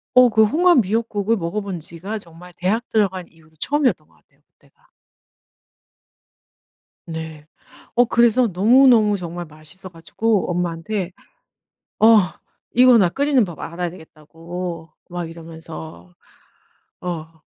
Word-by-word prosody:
어 250 -1 +7
그 220 0 +4
홍합 340 +5 +4
미역국을 220 0 0
먹어본 190 +1 -4
지가 170 +7 -6
정말 175 0 -14
대학 215 +7 -1
들어간 190 -4 0
이후로 160 -1 -24
처음이었던 290 -2 0
것 - - -29
같아요 - - -34
그때가. - - -31 2.2
네. 160 -3 -7 0.5
어 245 - +5
그래서 235 +1 +3
너무너무 220 +2 +5
정말 175 -1 -6
맛있어가지고 175 +7 -3
엄마한테 180 +2 -3 0.9
"어 220 - +6 0.7
이거 250 -1 +7
나 185 - +4
끓이는 275 +3 +2
법 175 -4 -9
알아야 175 +1 -4
되겠다."고 165 0 -8 0.2
막 175 -1 -5
이러면서 90 - -10 0.9
어. 165 -2 -7
180 Hz, 265 characters per minute, -21 LUFS, 165-225 Hz, 2.2 s, 어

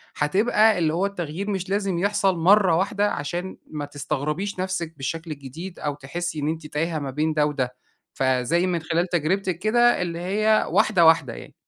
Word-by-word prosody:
هتبقى 210 +6 +3
اللي 160 -2 +1
هو 180 +4 +1
التغيير 190 0 -4
مش 190 -2 -3
لازم 195 -3 0
يحصل 195 -1 +1
مرّة 185 +1 +5
واحدة، 200 +3 +1
عشان 175 +6 -4
ما 150 -2 -4
تستغربيش 150 +7 -3
نفسِك 180 -3 -3
بالشكل 160 +4 -4
الجديد، 155 +6 -8
أو 145 -1 -2
تحسي 155 +4 -5
إن 145 - -2
أنتِ 160 -1 -4
تايهة 155 +2 -2
ما 140 -2 -4
بين 155 +3 0
ده 150 -1 +2
وده. 130 -4 -2 0.4
فَزي 130 +7 +1
من 175 -2 0
خلال 165 +3 0
تجربتِك 175 +1 -1
كده، 240 +4 +3
اللي 170 -1 -3
هي 215 +4 +2
واحدة 185 -6 +3
واحدة 160 -7 +4
يعني. - - -11
170 Hz, 175 wpm, -24 LUFS, 150-195 Hz, 0.4 s, مرّة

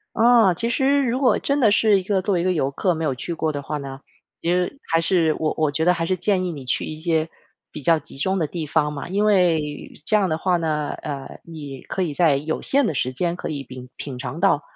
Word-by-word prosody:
啊， 230 -5 +5
其 230 +7 -1
实 275 +3 +2
如 250 +1 0
果 260 - +4
真 280 +1 0
的 225 -5 +5
是 205 -1 +4
一 - - -7
个 190 0 0
作 200 +1 0
为 175 - +1
一 - - -1
个 185 - +2
游 140 -6 0
客 180 +6 0
没 160 0 -3
有 135 - 0
去 170 +7 -5
过 160 -1 -1
的 145 -1 -4
话 150 +2 -4
呢， 135 -1 -7 0.4
其 170 - 0
实 180 +10 0
还 165 - +4
是， 165 -2 +2
我 155 - 0
我 155 -2 +1
觉 160 +3 0
得 180 - +5
还 165 -1 -2
是 185 - 0
建 185 0 0
议 180 - -2
你 140 -4 -8
去 125 - -1
一 155 0 -7
些 160 -1 0 0.4
比 150 - -8
较 165 +3 +4
集 145 - -13
中 190 +8 0
的 160 - +1
地 160 +1 -5
方 150 0 +1
嘛。 145 +2 -6
因 200 +3 0
为 165 -8 +1
这 215 - +3
样 200 -3 +2
的 155 - 0
话 180 +1 +1
呢， 155 -3 -1
呃， 140 -2 -6
你 145 -5 -9
可 190 - -3
以 160 -5 -2
在 155 -4 +4
有 155 +3 -3
限 275 -2 +3
的 160 - -1
时 130 -1 -1
间 175 +5 -1
可 - - -5
以 145 -3 -4
品 130 -1 -10
品 135 -3 -6
尝 130 +5 -5
到， 180 -7 +3
165 Hz, 285 characters per minute, -22 LUFS, 150-190 Hz, 0.4 s, 啊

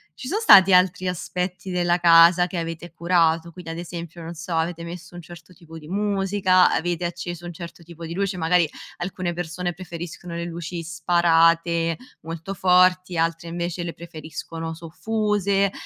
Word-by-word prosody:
Ci 255 - -8
sono 405 +10 -1
stati 195 - +8
altri 180 0 +3
aspetti 180 +1 -4
della 175 -1 +1
casa 170 +1 +6
che 180 -1 -4
avete 165 0 -6
curato, 170 -1 +1
quindi, 165 -1 -9
ad 165 - -6
esempio, 170 -1 -8
non 165 +1 -7
so, 165 +1 -5
avete 170 +1 -1
messo 175 +1 -9
un 175 - -8
certo 175 +2 -13
tipo 165 -1 -12
di 150 - -13
musica? 195 -1 +2
Avete 175 +1 -1
acceso 175 0 -5
un 175 - -5
certo 170 +1 -10
tipo 170 0 -10
di 165 - -6
luce? 195 +1 -2
Magari, 165 -1 +2 0.3
alcune 175 -1 -3
persone 175 +1 -4
preferiscono 170 0 -8
le 170 0 -3
luci 170 0 -6
sparate, 165 0 +2 0.2
molto 165 +4 -6
forti, 180 -1 +3
altre 165 0 -1
invece 175 +1 -3
le 170 - -5
preferiscono 165 0 -7
soffuse 200 +3 0
175 Hz, 165 wpm, -23 LUFS, 165-180 Hz, 0.3 s, stati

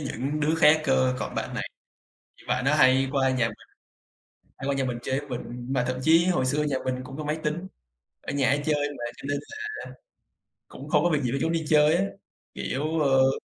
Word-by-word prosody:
những 145 +1 -3
đứa 155 +2 +2
khác 155 -1 +5
cơ, 130 -2 +2
còn - - -5
bạn - - -3
này - - -3 0.7
thì - - -19
bạn 125 +1 0
đó 145 - +3
hay 135 -2 +5
qua 135 -2 +2
nhà 125 -3 +1
mình, 110 - -8 1.0
hay 135 - -4
qua 140 - +2
nhà 135 - 0
mình 125 -2 -2
chơi 130 +2 -1
với 145 -1 -11
mình, 120 0 -6
mà 125 - +1
thậm 130 - -2
chí 165 +2 +5
hồi 175 -8 +1
xưa 150 +3 +1
nhà 145 -2 -1
mình 130 0 0
cũng 135 +2 -9
có 155 - -4
máy 150 +1 -1
tính, 165 +5 -2 0.5
ở - - -5
nhà 140 -3 +2
hay 145 +1 +2
chơi 145 -2 +1
mà 120 - -6
cho - - -10
nên 145 0 0
là 430 - -11 1.1
cũng - - -11
không - - +3
có 175 - +3
việc 150 -3 +1
gì 120 - 0
phải 135 - -1
trốn 165 - +1
đi 165 -2 -1
chơi 150 0 +5
á, - - +2 0.5
kiểu, 155 +4 -2
ơ 135 -2 +3
140 Hz, 230 wpm, -26 LUFS, 130-150 Hz, 1.1 s, khác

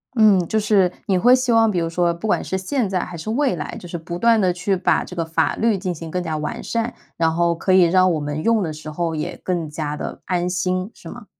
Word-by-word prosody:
嗯， 215 -4 +6
就 220 - +1
是 200 -4 +3
你 190 -2 +2
会 250 +6 +6
希 255 -1 0
望， 225 -1 +5
比 190 - -1
如 165 -1 0
说 170 +1 +1
不 170 +6 -8
管 220 - +1
是 190 - -2
现 225 +3 -1
在 185 -2 0
还 180 - -6
是 170 +6 -6
未 260 -2 +1
来， 150 - -6
就 175 - -10
是 170 - -7
不 170 +2 -6
断 230 +1 +4
地 185 -2 +3
去 180 +3 -1
把 180 - +1
这 180 - -10
个 170 - -1
法 160 0 0
律 225 -2 +1
进 185 -1 -3
行 165 0 -8
更 180 +2 -2
加 160 -2 -3
完 155 +10 -4
善， 230 +1 -2 0.2
然 165 -1 +2
后 170 0 +2
可 185 +3 0
以 185 -1 +7
让 185 +1 +4
我 155 - -1
们 145 +1 -3
用 230 -3 +2
的 160 -3 -3
时 155 0 -8
候 165 +1 -2
也 155 -1 -4
更 170 -4 -2
加 150 -1 -4
地 - - -6
安 180 -1 -1
心， 185 +1 -1
是 - - -13
吗？ - - -10
180 Hz, 290 characters per minute, -21 LUFS, 165-210 Hz, 0.2 s, 以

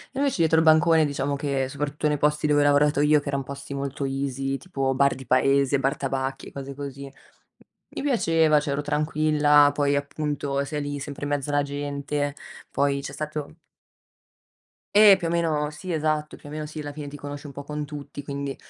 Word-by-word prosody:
E - - -6
invece 280 -2 +1
dietro 160 0 +4
il 160 - +4
bancone, 160 0 +5
diciamo 140 -1 -2
che, 140 -2 -1
soprattutto 145 +2 -2
nei 150 - +1
posti 150 +1 +1
dove 145 -1 +3
ho - - +4
lavorato 145 0 +3
io, 150 0 +5
che 145 - -11
eran 140 -1 -1
posti 140 +1 -8
molto 140 0 -4
easy; 135 0 -2
tipo 135 -7 -2
bar 140 +1 +3
di 130 - -10
paese, 135 +2 +3
bar 135 +1 +1
tabacchi 135 0 -3
e - - -11
cose 140 0 -7
così, 140 0 -7
m - - -12 0.9
mi - - -3
piaceva, 165 - +3
cioè 145 - -4
ero 140 - -1
tranquilla, 150 -1 +3
poi 145 -1 +1
appunto, 140 -1 -2
sei 150 +1 -4
lì 145 0 -4
sempre 145 0 -6
in 145 - -3
mezzo 145 0 -1
alla 145 0 +2
gente, 145 0 -3 0.4
poi 140 0 +1
c'è 140 - -6
stato 150 +1 -5 1.4
E 205 -2 +8
più 170 - -3
o - - -2
meno 155 -3 0
Sì, 160 +4 -6
esatto, 155 -1 -1
più 145 - -13
o - - -9
meno 155 0 -4
sì, 155 +1 -7
alla 145 -1 -6
fine 145 0 -7
ti 145 - -8
conosci 145 +1 -7
un 140 - -9
po' 140 - -7
con 150 +1 -4
tutti, 145 -1 -8
quindi 140 -1 -4
145 Hz, 210 wpm, -25 LUFS, 140-150 Hz, 1.4 s, E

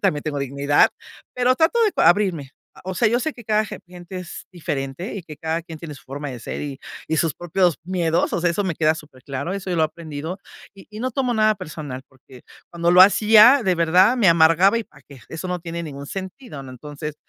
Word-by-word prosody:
También 145 -1 +1
tengo 150 -2 -3
dignidad 140 - +2 0.4
pero 250 0 +3
trato 325 - +2
de 420 - +1
cua 165 - +4
abrirme, 175 -5 +2 0.3
eh, - - -14
o 190 - -4
sea, 220 +4 +3
yo 240 +3 +1
sé 315 +2 -2
que 240 - -13
cada 215 0 +1
ge - - -8
gente 180 +1 -10
es 180 -1 -9
diferente 145 -1 -5
y 195 - -6
que 155 -3 -11
cada 160 +2 -3
quien 160 -1 -10
tiene 155 -2 -8
su 140 - -15
forma 145 +2 -6
de 125 -2 -8
ser - - -6
y 140 -2 -6 0.3
y 160 - 0
sus 160 -3 +1
propios 175 -1 0
miedos. 175 -2 0
O - - -1
sea, 175 0 +2
eso 200 +4 -1
me 180 -4 -2
queda 155 -1 +2
superclaro 140 +1 -7
eso 195 -1 -5
yo 175 - -1
lo 160 - +2
he - - +4
aprendido 160 +2 -7 0.4
y 195 - -15
y 215 0 -9
no 255 +2 -1
tomo 250 -2 -1
nada 215 0 +3
personal 150 -6 -7
porque 130 -1 -18 0.3
cuando 170 0 +1
lo 180 +1 +6
hacía 220 +6 +6
de 185 -2 +2
verdad 180 +8 +4
me 220 -7 +4
amargaba 170 +6 +5
¿y 230 - -5
para - - -21
qué? 135 -4 -13
Eso 160 +3 -6
no 180 -1 -3
tiene 170 0 -5
ningún 140 -2 -8
sentido, 190 - -8
¿no? 130 - -10
Entonces, 145 +4 -8
170 Hz, 235 wpm, -22 LUFS, 150-195 Hz, 0.4 s, lo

